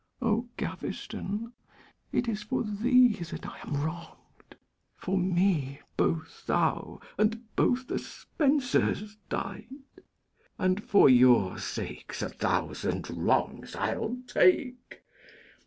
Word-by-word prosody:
O 235 0 0
Gaveston, 220 +4 -5 0.6
it 245 - 0
is 215 -2 -2
for 205 - -1
thee 240 +3 +4
that 170 -2 -7
I - - -9
am 145 0 -3
wrong'd! 170 +2 -9 0.4
For 190 - -2
me 180 -7 +1 0.2
both 160 -1 -1
thou - - 0 0.2
and 225 +1 0
both 255 +1 +2
the - - -1
Spensers 250 - 0
died; 260 +6 -5 0.7
And 185 +3 +1
for 200 - +6
your 125 -7 +5
sakes - - -5
a - - -2
thousand - - -2
wrongs - - 0
I'll 240 +3 -2
take. 250 -3 +1
210 Hz, 105 wpm, -29 LUFS, 175-245 Hz, 0.7 s, for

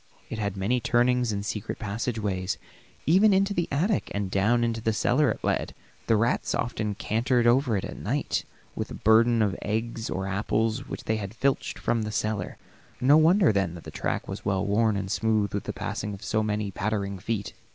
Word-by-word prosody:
It 110 - -4
had 100 -2 -2
many 110 +6 +1
turnings 120 0 +2
and 100 0 -3
secret 105 -2 -4
passageways; 100 -3 -2 0.5
even 195 +6 +5
into 195 +1 +2
the 175 -3 0
attic 180 +9 +1
and 100 -2 -2
down 110 +5 +2
into 115 -1 -1
the 110 0 +1
cellar 130 +6 +2
it - - -3
led. - - -1 0.3
The 115 - +4
rats 115 +3 +1
often 110 -3 -2
cantered 120 +3 +1
over 120 -2 +3
it 95 - -3
at - - -7
night - - -1 0.3
with - - -5
burdens 115 +1 +5
of 100 -3 0
eggs 110 +1 -2
or 95 +1 -2
apples 110 +5 -1
which - - -6
they 110 0 -1
filched 125 +7 -1
from 115 - 0
the 105 0 -3
cellar; 105 -2 -2 0.4
no 135 +4 +5
wonder 165 - +5
then 95 -4 0
the 85 - -9
track - - -2
was - - -6
well 95 0 0
worn 105 +1 +2
and 95 -1 -3
smooth 110 -2 +1
with 100 - -2
the - - -2
passing 105 -1 -4
of 100 - -13
so 110 - 0
many 105 -1 -1
pattering 100 -1 -2
feet. 105 +1 -3
110 Hz, 190 wpm, -27 LUFS, 100-120 Hz, 0.5 s, even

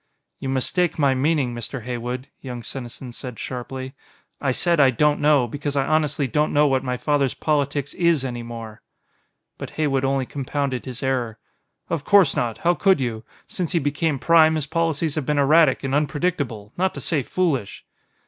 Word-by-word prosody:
"You 135 - -4
mistake 160 +6 +1
my 140 -3 +3
meaning, 135 -1 +1
Mr. 120 +1 -5
Heywood," 125 +2 -4
young 125 -3 -7
Senesin 125 +1 -7
said 125 -1 -8
sharply. 130 +1 -6 0.5
"I 135 - +1
said, 170 +5 +1
'I 135 -2 +7
don't 150 +4 +2
know' 145 -3 +4
because 145 +3 -4
I 135 -1 +2
honestly 150 -2 +1
don't 150 +4 +1
know 150 +1 +4
what 135 -2 +2
my 125 -1 -2
father's 140 +1 +1
politics 145 -2 -1
is 170 -6 +2
any 120 -2 -4
more." 115 -2 -8 0.8
But - - -6
Heywood 140 -4 +1
only 135 -1 +1
compounded 140 -1 -3
his 125 -1 -6
error. 125 -4 -1 0.5
"Of 160 -4 -2
course 200 +2 +5
not. 115 -3 -1
How 175 +6 +2
could 190 -1 +3
you? 120 -3 -3 0.2
Since 180 -1 -4
he - - +3
became 145 +1 0
Prime, 160 +2 +5
his 155 -3 -1
policies 165 -1 -1
have 150 -4 -3
been 150 - +1
erratic 145 0 +4
and 135 0 -2
unpredictable, 145 - -1
not 190 +1 0
to - - -5
say 155 -4 0
foolish." 140 - -2
140 Hz, 175 wpm, -23 LUFS, 125-155 Hz, 0.8 s, I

